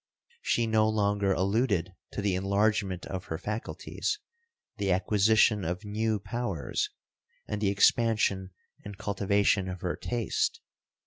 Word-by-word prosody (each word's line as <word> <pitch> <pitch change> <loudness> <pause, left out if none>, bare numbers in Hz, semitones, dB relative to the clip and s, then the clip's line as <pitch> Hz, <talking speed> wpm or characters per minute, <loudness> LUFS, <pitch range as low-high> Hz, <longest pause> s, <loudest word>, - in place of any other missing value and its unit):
She 120 - +1
no 110 -1 +3
longer 100 -2 +1
alluded 95 0 +1 0.2
to 100 - -3
the 100 -2 +2
enlargement 100 0 +1
of 95 -2 -5
her 80 - -4
faculties, 105 +5 -3 0.6
the 100 -2 0
acquisition 105 +2 +3
of 90 +5 -3
new 110 +1 0
powers, 100 - -2 0.6
and 105 0 -3
the 100 - +2
expansion 100 -2 +3 0.3
and 100 -1 -8
cultivation 100 -1 +1
of 90 -1 -6
her 90 - -1
taste. 120 -2 -1
100 Hz, 125 wpm, -29 LUFS, 95-110 Hz, 0.6 s, no